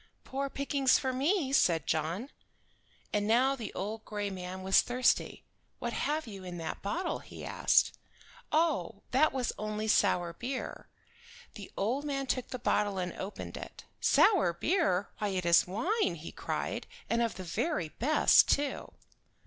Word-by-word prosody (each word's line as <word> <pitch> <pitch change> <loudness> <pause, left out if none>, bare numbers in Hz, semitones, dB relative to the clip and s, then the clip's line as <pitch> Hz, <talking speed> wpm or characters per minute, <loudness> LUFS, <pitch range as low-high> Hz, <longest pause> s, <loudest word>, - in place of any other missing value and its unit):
"Poor 275 +1 -3
pickings 275 -1 +2
for 260 -1 -2
me!" 280 +1 +1
said 165 - +3
John. 165 - -1 0.8
And 205 0 +1
now 255 +5 +4
the 230 -6 -6
old 215 +3 -4
gray 205 -1 -3
man 185 0 -6
was 190 +1 +5
thirsty. 250 0 +1 0.3
"What - - -4
have 305 +2 -1
you 200 -4 -9
in 180 -1 -6
that 165 - -5
bottle?" 325 - -2
he - - -10
asked. - - +3 0.6
"Oh, 300 - +1
that 290 +5 +4
was 255 -3 -1
only 215 0 -3
sour 180 -5 +2
beer." 255 +8 -5 0.7
The - - -10
old 245 +8 0
man 275 -2 -2
took 255 -1 -1
the 255 - -5
bottle 210 -4 +1
and 180 -1 -2
opened 195 +2 -6
it. - - -9 0.2
"Sour 335 - +4
beer! 205 - +1
Why 210 - 0
it 185 -3 -2
is 170 +1 +5
wine," 280 - 0
he 165 0 -8
cried, - - -3 0.2
"and 235 0 +1
of 230 -1 0
the 185 - -6
very 180 - -1
best, 280 - +4
too." 285 -1 0
220 Hz, 155 wpm, -31 LUFS, 185-275 Hz, 0.8 s, was